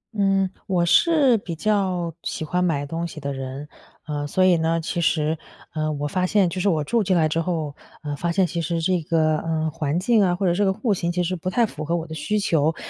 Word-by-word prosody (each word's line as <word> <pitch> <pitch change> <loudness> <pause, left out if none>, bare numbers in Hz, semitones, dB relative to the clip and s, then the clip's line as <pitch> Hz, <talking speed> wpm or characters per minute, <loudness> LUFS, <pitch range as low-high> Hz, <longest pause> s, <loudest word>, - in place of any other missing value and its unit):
嗯， 195 -1 +2 0.2
我 180 -3 +2
是 275 - +4
比 175 -4 -6
较， 185 -3 0
喜 155 - -4
欢 180 +3 0
买 150 -5 0
东 165 +4 -3
西 160 - -9
的 140 -1 -4
人。 135 +2 -6 0.4
呃， 145 -1 -3
所 185 +6 +1
以 185 -2 +5
呢 165 +1 0
其 170 +2 -3
实 160 -1 +1 0.4
呃， 155 -1 -1
我 145 0 -3
发 185 +3 0
现， 190 -2 +3
就 185 - -4
是 190 - 0
我 160 -5 +2
住 230 +10 +1
进 185 -1 +1
来 155 -2 +3
之 165 - 0
后， 160 -4 -2 0.3
呃， 145 -1 -3
发 170 0 -1
现 190 +1 +3
其 170 -1 -3
实 165 +1 -1
这 180 0 +1
个， 155 -1 +2
呃， 160 -1 -1
环 150 +1 -2
境 215 +4 +3
啊， 180 -3 +3
或 195 +2 -2
者 175 - +3
这 205 +3 +1
个 190 - +2
户 220 0 0
型 170 -2 -2
其 180 +1 0
实 180 +1 -2
不 185 +3 -3
太 235 +5 +2
符 155 -7 -6
合 170 +3 0
我 165 -1 -2
的 160 - -8
需 160 +8 -1
求。 160 -5 +1
170 Hz, 265 characters per minute, -23 LUFS, 155-185 Hz, 0.4 s, 以